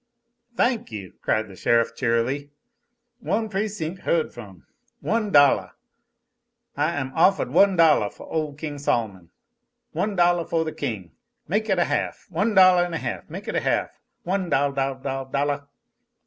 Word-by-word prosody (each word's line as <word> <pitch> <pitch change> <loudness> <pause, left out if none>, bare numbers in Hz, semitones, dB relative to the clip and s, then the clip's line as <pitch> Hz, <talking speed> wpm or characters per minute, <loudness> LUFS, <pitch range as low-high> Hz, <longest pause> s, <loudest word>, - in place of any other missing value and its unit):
"Thank 240 - +1
you!" 100 -4 -7
cried 110 0 0
the 95 - -12
sheriff, 115 +3 +2
cheerily. 125 +4 0 0.7
"One 220 -1 -1
precinc' 195 -4 -3
heard 170 -3 0
from! 100 -7 -12 0.3
One 220 -2 -1
dollah! 145 -3 +4 1.0
I 150 +4 0
am 135 -4 -3
offahed 190 +4 +3
one 200 -1 +5
dollah 155 - +4
foh - - -13
ole 155 -3 -3
King 150 -1 -6
Sol'mon. 105 -10 -2 0.6
One 205 0 -2
dollah 175 -1 +3
foh 165 -1 0
the 160 - -4
king! 95 - -5 0.4
Make 215 +5 -1
it 190 - +2
a 175 - +3
half. - - -2
One 205 +6 0
dollah 185 -2 +6
an' 170 - -5
a - - 0
half. - - -5
Make - - -8
it - - -3
a - - 0
half. - - -1 0.2
One 185 0 -1
dol 140 -1 +2
dol 135 0 -1
dol 135 0 -4
dollah!" 140 +1 -2
150 Hz, 160 wpm, -24 LUFS, 130-185 Hz, 1.0 s, dollah